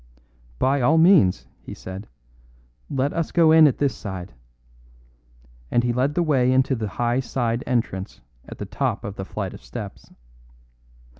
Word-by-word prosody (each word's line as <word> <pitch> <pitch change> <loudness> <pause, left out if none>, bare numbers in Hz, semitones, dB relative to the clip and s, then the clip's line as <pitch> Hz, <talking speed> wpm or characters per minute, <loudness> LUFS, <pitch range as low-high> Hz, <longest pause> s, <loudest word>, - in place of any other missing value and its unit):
"By 135 - +1
all 150 +7 +4
means," 160 - +5 0.2
he - - -9
said; 95 +3 -8 0.8
"let 135 +2 -1
us 165 -2 -2
go 165 -2 +5
in 160 -1 +8
at 135 - 0
this 140 -3 +1
side." 95 -2 -7 1.4
And 120 - +2
he 120 -1 0
led 135 +4 0
the 175 - +2
way 130 -6 +2
into 130 +1 +2
the 110 -4 -2
high 120 +1 +1
side 120 -2 -2
entrance 110 -6 -2 0.3
at - - -9
the - - -5
top - - -2
of 100 0 -6
the 95 - -6
flight - - -5
of - - -11
steps. - - -9
125 Hz, 160 wpm, -23 LUFS, 105-145 Hz, 1.4 s, in